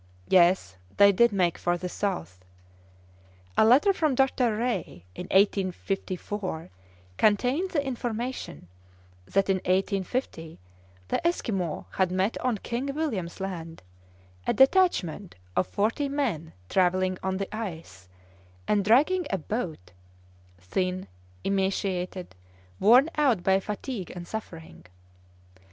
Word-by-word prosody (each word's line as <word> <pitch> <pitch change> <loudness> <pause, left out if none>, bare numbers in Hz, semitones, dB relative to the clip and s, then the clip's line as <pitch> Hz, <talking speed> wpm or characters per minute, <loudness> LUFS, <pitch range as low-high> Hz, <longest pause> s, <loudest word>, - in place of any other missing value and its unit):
Yes, 175 - +4 0.2
they 200 0 +8
did 235 +4 +4
make 180 -4 +1
for 175 0 0
the 180 +1 -4
south! 95 - -4 1.1
A - - +5
letter 265 - +5
from 310 -7 +1
Dr. 250 -4 +2
Rae 230 - -3
in 180 - -7
1854 190 - -1 0.5
contained 250 - +2
the 290 -6 -1
information 245 - -4 0.6
that 195 - +1
in 195 -1 +2
1850 185 -2 -2 0.5
the 335 - +1
Esquimaux 195 - -2
had 185 -1 +1
met 190 +4 0
on 250 -4 0
King 240 +6 -4
William's 215 - -3
Land 170 - -6 0.6
a - - +3
detachment 265 - +3 0.2
of - - +1
forty 225 +8 0
men 230 - -2
travelling 185 - +1
on 190 0 -1
the 195 +2 -4
ice, 160 - -7 0.6
and 205 -1 +2
dragging 295 - +3
a 195 - 0
boat, 160 - -5 0.7
thin, 185 - -2 0.4
emaciated, 190 - -1 0.5
worn 245 +8 +6
out 250 -11 +3
by 190 0 +4
fatigue 210 0 -5
and 175 -1 -7
suffering! 80 - -8
195 Hz, 115 wpm, -27 LUFS, 180-240 Hz, 1.1 s, they